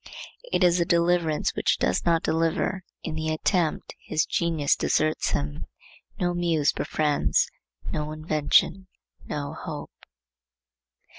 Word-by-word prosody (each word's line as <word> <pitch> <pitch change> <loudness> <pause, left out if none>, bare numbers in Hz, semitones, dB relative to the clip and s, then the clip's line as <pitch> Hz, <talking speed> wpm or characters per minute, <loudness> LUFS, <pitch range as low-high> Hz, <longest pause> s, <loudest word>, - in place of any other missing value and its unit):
It - - +2
is 175 0 +4
a - - +4
deliverance 170 -2 +2
which - - +1
does 90 - 0
not 165 -1 +3
deliver. 165 +3 0 0.2
In - - -4
the 160 0 -2
attempt 160 +1 0
his 155 - 0
genius 165 -4 +1
deserts 155 0 +1
him; 75 0 -3 0.5
no 175 -1 +1
muse 165 -4 +1
befriends; 150 -2 +1 0.4
no 150 0 -2
invention, 155 +4 +1 0.4
no 145 -1 -4
hope. - - -7
160 Hz, 120 wpm, -26 LUFS, 155-170 Hz, 0.5 s, is